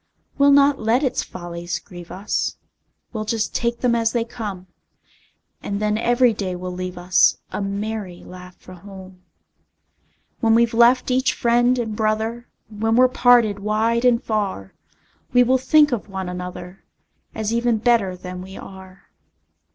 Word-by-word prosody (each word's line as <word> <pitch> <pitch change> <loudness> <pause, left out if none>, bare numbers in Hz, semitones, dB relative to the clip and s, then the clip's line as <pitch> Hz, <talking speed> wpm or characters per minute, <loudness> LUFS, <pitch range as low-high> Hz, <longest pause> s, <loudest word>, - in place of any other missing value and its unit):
We'll 280 0 +6
not 280 0 +5
let 225 +5 +1
its 260 -2 0
follies 175 -1 -6
grieve 175 -2 -12
us, 200 +3 -3 0.6
We'll 215 -2 -3
just 220 0 -2
take 235 0 -2
them 245 -2 +2
as 230 -1 +1
they 235 -2 0
come; 210 -6 -7 1.0
And 200 0 -4
then 210 0 0
every 240 +2 +3
day 190 -3 -4
will 180 0 -6
leave 180 0 -6
us 175 0 +3
A - - -4
merry 200 -2 -4
laugh 180 0 -12
for 185 - -14
home. 190 0 -13 1.2
When 225 -1 +3
we've 235 0 +3
left 240 +3 +4
each 260 +1 +2
friend 240 +1 +2
and 225 -3 -3
brother, 220 +2 -2 0.2
When 225 +1 -1
we're 255 +1 +5
parted 240 -5 +4
wide 220 +3 0
and 245 0 +3
far, 200 - -3 0.6
We 245 0 +6
will 260 +2 +2
think 300 +2 +4
of 225 -3 -3
one 190 -1 -5
another, 180 0 -8 0.5
As 220 0 -2
even 235 -1 +1
better 215 -5 +1
than 180 0 -8
we 190 +1 -10
are. 190 0 -12
215 Hz, 155 wpm, -21 LUFS, 185-240 Hz, 1.2 s, We'll